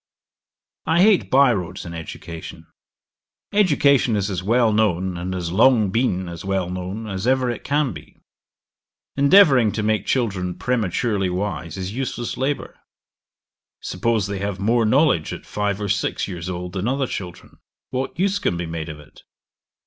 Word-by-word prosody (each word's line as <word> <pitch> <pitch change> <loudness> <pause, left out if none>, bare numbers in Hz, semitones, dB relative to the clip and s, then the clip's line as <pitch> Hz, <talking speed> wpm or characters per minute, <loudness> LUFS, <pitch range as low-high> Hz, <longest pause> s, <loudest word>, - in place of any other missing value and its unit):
'I 165 +2 +3
hate 210 -3 +4
by 135 -2 +5
roads 90 -6 -5
in 85 - -7
education. 80 0 -8 0.9
Education 140 - +3
is 100 0 -1
as 95 -1 -2
well 115 +3 +2
known, 95 -4 +1
and 90 +2 -4
has 85 -2 -3
long 110 0 +4
been 95 -5 0
as 85 -1 -7
well 95 -2 -1
known, 95 +4 -5
as 100 +1 -4
ever 130 -1 +2
it 120 - -7
can 145 -4 0
be. 75 -1 -13 1.0
Endeavouring 140 - +6
to 110 - -2
make 110 0 0
children 95 -8 -1
prematurely 105 -4 0
wise 90 -3 -3
is 95 +1 -4
useless 120 -1 -3
labour. 140 +2 -3 1.0
Suppose 110 +2 -1
they 100 -1 -4
have 100 -1 -3
more 115 +3 +2
knowledge 130 - +2
at - - -9
five 105 -1 -2
or 105 - -3
six 100 0 -1
years 90 -2 -6
old 90 0 -5
than 95 +3 -2
other 135 +2 0
children, 90 -7 -8 0.3
what 130 +1 -3
use 195 +2 +1
can 85 - -1
be 85 - -3
made 80 -1 -5
of 75 -1 -8
it? 75 - -17
105 Hz, 160 wpm, -22 LUFS, 90-125 Hz, 1.0 s, Endeavouring